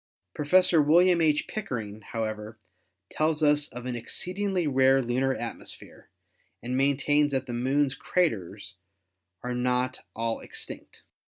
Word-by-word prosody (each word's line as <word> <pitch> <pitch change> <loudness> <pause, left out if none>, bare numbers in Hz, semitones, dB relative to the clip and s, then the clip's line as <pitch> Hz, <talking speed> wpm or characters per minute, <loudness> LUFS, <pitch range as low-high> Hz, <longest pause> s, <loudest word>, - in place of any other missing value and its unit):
Prof. 180 +5 +3
William 175 +2 +5
H. 155 -2 +2
Pickering, 110 - -5
however, 110 0 -5 0.5
tells 155 0 0
us 145 0 +3
of 125 0 -9
an 125 -1 -3
exceedingly 180 - -2
rare 135 -1 +4
lunar 130 +2 0
atmosphere 120 - -8 0.5
and 125 +2 -3
main 135 +1 +2
tains 145 +1 +2
that 135 -2 -2
the 125 - -6
Moon's 135 +3 +1
craters 105 - -2 0.7
are 125 0 -3
not 125 +1 0 0.2
all 115 0 -1
extinct. - - -7
130 Hz, 125 wpm, -27 LUFS, 120-150 Hz, 0.7 s, William